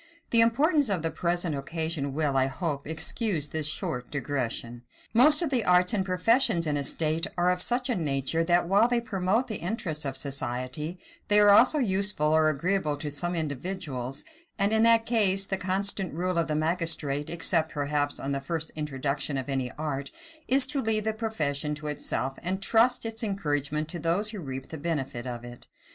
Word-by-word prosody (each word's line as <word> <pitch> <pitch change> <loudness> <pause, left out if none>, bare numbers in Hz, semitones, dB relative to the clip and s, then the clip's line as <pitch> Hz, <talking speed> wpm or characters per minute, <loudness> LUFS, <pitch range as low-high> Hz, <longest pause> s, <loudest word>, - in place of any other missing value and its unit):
The 230 - +6
importance 280 +4 +3
of 185 -5 -1
the 165 - -1
present 170 0 -1
occasion 145 0 -3
will, 150 -3 0
I 135 0 +3
hope, 140 0 -4
excuse 160 - +1
this 155 -2 -1
short 125 -4 -3
digression. 125 -4 -3 0.3
Most 300 +7 +6
of 320 - -2
the 250 -4 +1
arts 180 +3 +4
and 200 -3 +1
professions 185 0 +2
in 150 -2 0
a 145 - 0
state 160 +4 0
are 175 +1 +3
of 180 0 +1
such 245 +5 +2
a 250 - 0
nature, 155 - 0
that, 175 0 +2
while 200 +5 +4
they 245 -1 +1
promote 210 +1 -1
the 215 - -3
interests 170 -5 -3
of 135 -2 -3
the - - 0
society, 135 +4 -3 0.3
they 210 0 +5
are 205 -1 +6
also 250 +9 +6
useful 195 - +2
or 155 0 +4
agreeable 155 0 -1
to 145 0 -5
some 175 +5 -1
individuals; 145 -4 -4 0.3
and, 200 +1 +1
in 220 - +3
that 230 0 +4
case, 195 -5 +2
the 195 - -1
constant 190 -1 -1
rule 180 +1 -1
of 165 - 0
the 150 - -1
magistrate, 155 -3 0
except, 165 -1 +1
perhaps, 145 0 -1
on 135 - -4
the 140 0 -2
first 160 +3 -4
introduction 140 -1 -2
of 130 +1 -4
any 130 -2 -2
art, 145 -2 -4 0.4
is 265 +1 +5
to 275 0 0
leave 220 -2 +1
the 220 +1 -1
profession 155 -10 -2
to 150 +1 -10
itself, 135 -2 -3
and 190 +3 -2
trust 235 +2 +3
its 225 0 -3
encouragement 150 -7 -2
to 170 +2 -6
those 175 +7 0
who 210 - -7
reap 135 -4 -7
the 160 - -7
benefit 135 -6 -3
of 120 -1 -6
it. 120 0 -11
165 Hz, 190 wpm, -27 LUFS, 145-200 Hz, 0.4 s, The